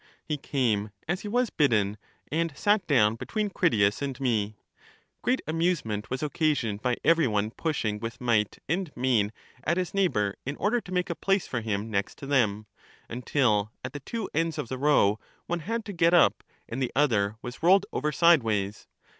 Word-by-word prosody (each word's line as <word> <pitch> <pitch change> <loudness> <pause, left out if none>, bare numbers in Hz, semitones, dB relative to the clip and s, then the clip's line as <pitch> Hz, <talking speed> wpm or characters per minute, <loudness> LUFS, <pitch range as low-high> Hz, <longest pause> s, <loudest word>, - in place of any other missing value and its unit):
He 155 - -1
came 120 -8 0 0.2
as 175 +3 -1
he - - -6
was 245 +2 +1
bidden, 105 -9 +2 0.4
and 160 -2 -1
sat 205 0 +2
down 115 -6 +3
between 210 - -2
Critias 110 - +2
and 135 -2 -3
me. 110 -5 0 0.7
Great 255 +2 0
amusement 155 - -1
was 130 +3 -3
occasioned 145 -9 0
by 125 0 0
every 165 -3 +4
one 105 0 0
pushing 115 -9 -2
with 115 +2 -6
might 115 -4 +1
arid 175 +1 -1
main 120 -5 +2 0.3
at 170 +4 +1
his 185 -1 -2
neigh 195 -1 +3
bor 105 - -1
in 140 +2 -4
order 225 +8 +1
to 185 - -12
make 180 -1 0
a - - -3
place 195 +2 +1
for 125 - -3
him 110 0 -3
next 100 -1 -2
to - - -8
them, 110 -7 +1 0.4
until 115 -4 +1 0.2
at 130 - -6
the 145 - -5
two 220 - -4
ends 165 0 0
of 115 - -4
the 130 - -4
row 120 -8 +3 0.3
one 175 0 -2
had 225 +7 -3
to 205 - -6
get 170 0 +4
up 170 - +4 0.2
and 120 +4 -4
the 130 - -1
other 110 -8 +2
was 120 0 -7
rolled 190 +4 +5
over 150 +3 0
sideways. 115 - +2
135 Hz, 190 wpm, -27 LUFS, 110-170 Hz, 0.7 s, rolled